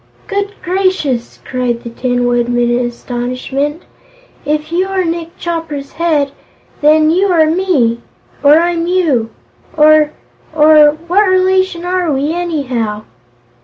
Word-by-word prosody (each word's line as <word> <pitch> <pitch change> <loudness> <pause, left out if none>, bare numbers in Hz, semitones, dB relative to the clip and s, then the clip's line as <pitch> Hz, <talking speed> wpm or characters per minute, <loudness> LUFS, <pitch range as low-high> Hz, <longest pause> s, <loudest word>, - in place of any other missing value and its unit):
"Good 405 0 -3
gracious!" 360 -10 -1
cried 245 -2 -2
the 235 - -7
Tin 245 +1 -1
Woodman 240 0 +1
in 240 0 0
astonishment. 255 +5 -4 0.6
"If 305 +2 -2
you 365 +3 0
are 380 -1 -1
Nick 330 0 -4
Chopper's 325 -5 -5
Head, 305 -4 0 0.5
then 310 +1 +4
you 375 +4 +2
are 335 -4 +3
Me 310 -9 +1 0.4
or 290 +1 +6
I'm 340 0 0
You 315 -11 +1 0.5
or 305 0 +5 0.5
or 305 -1 +5
What 390 +4 +2
relation 370 -1 +1
are 360 -2 0
we, 285 +3 -1
anyhow?" 255 -11 -3
310 Hz, 125 wpm, -14 LUFS, 255-350 Hz, 0.6 s, or